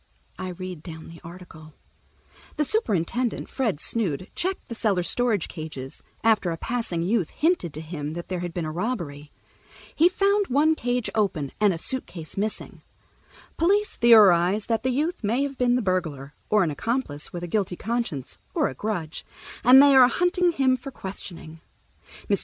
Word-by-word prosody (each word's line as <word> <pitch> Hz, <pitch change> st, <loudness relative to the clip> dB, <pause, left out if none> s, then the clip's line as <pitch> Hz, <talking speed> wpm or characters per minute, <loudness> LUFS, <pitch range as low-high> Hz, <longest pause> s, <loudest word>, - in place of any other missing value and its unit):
I 185 Hz, -, -4 dB
read 180 Hz, -2 st, -7 dB
down 160 Hz, -1 st, -9 dB
the 165 Hz, 0 st, -12 dB
article: 165 Hz, -3 st, -12 dB, 0.8 s
"The 300 Hz, -, +1 dB
superintendent, 240 Hz, -, -1 dB
Fred 225 Hz, -, -1 dB
Snood, 185 Hz, -4 st, -1 dB
checked 375 Hz, +2 st, -3 dB
the 235 Hz, -, -6 dB
cellar 205 Hz, -6 st, 0 dB
storage 220 Hz, 0 st, +1 dB
cages, 155 Hz, -5 st, -6 dB, 0.2 s
after 215 Hz, -5 st, +3 dB
a 165 Hz, -, -3 dB
passing 225 Hz, -6 st, -2 dB
youth 195 Hz, -2 st, +1 dB
hinted 320 Hz, -, 0 dB
to 155 Hz, -, -5 dB
him 155 Hz, -2 st, -5 dB
that 170 Hz, +1 st, -6 dB
there 185 Hz, -1 st, -3 dB
had 175 Hz, 0 st, -4 dB
been 170 Hz, -1 st, -3 dB
a 155 Hz, -, -3 dB
robbery. 165 Hz, -, -4 dB, 0.6 s
He 335 Hz, +3 st, +5 dB
found 400 Hz, +2 st, +2 dB
one 295 Hz, +5 st, +3 dB
cage 245 Hz, -5 st, -1 dB
open 175 Hz, -10 st, 0 dB
and 210 Hz, -2 st, +4 dB
a 170 Hz, -, -2 dB
suitcase 170 Hz, -6 st, -4 dB
missing. 210 Hz, +2 st, -4 dB, 0.8 s
Police 400 Hz, +5 st, +2 dB
theorize 205 Hz, -4 st, +6 dB
that 225 Hz, -1 st, 0 dB
the 260 Hz, -, 0 dB
youth 300 Hz, +5 st, -1 dB
may 235 Hz, +7 st, +1 dB
have 275 Hz, -1 st, -5 dB
been 245 Hz, -1 st, +3 dB
the 250 Hz, -, 0 dB
burglar, 160 Hz, -7 st, -2 dB, 0.2 s
or 210 Hz, -2 st, +4 dB
an 165 Hz, -, 0 dB
accomplice 190 Hz, -, -2 dB
with 175 Hz, 0 st, -6 dB
a -, -, -3 dB
guilty 190 Hz, -1 st, -1 dB
conscience 225 Hz, -, -3 dB, 0.2 s
or -, -, +2 dB
a -, -, -7 dB
grudge, 175 Hz, -, -4 dB, 0.4 s
and 260 Hz, +3 st, +9 dB
they 285 Hz, -1 st, +6 dB
are 260 Hz, -2 st, +8 dB
hunting 355 Hz, +4 st, +1 dB
him 260 Hz, -3 st, +2 dB
for 275 Hz, +3 st, -8 dB
questioning. 175 Hz, -8 st, -8 dB, 0.7 s
Mr. -, -, +2 dB
205 Hz, 170 wpm, -25 LUFS, 165-250 Hz, 0.8 s, and